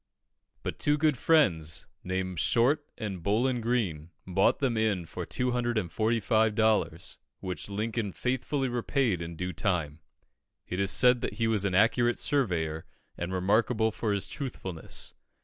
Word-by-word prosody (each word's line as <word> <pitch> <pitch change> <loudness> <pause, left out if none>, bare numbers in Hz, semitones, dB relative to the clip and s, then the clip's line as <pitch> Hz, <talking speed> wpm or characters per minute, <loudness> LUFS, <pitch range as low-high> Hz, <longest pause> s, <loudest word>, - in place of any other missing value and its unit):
But - - -4
two 145 0 +2
good 150 -1 +3
friends, 90 - +2 0.2
named 95 -1 -2
Short 135 - +3
and 100 -5 -4
Bowlin 120 +7 +1
Greene, 100 -10 -1 0.2
bought 95 +1 +3
them 130 -4 0
in 105 -6 +1
for - - -6
245 110 -2 +1
dollars, 110 0 +1 0.2
which 95 +1 -5
Lincoln 105 +1 -2
faithfully 130 +5 -1
repaid 120 - 0
in 85 0 -6
due 90 +2 -4
time. 80 -5 -1 0.7
It 90 - -3
is 100 -1 +1
said 125 +3 +4
that - - -2
he 115 +2 -1
was 110 -3 +1
an 95 -2 0
accurate 120 +4 +3
surveyor, 85 - 0 0.3
and 85 +1 -4
remarkable 110 +4 +2
for 110 0 -2
his 100 -1 0
truthfulness. 95 - -5
110 Hz, 140 wpm, -29 LUFS, 90-120 Hz, 0.7 s, said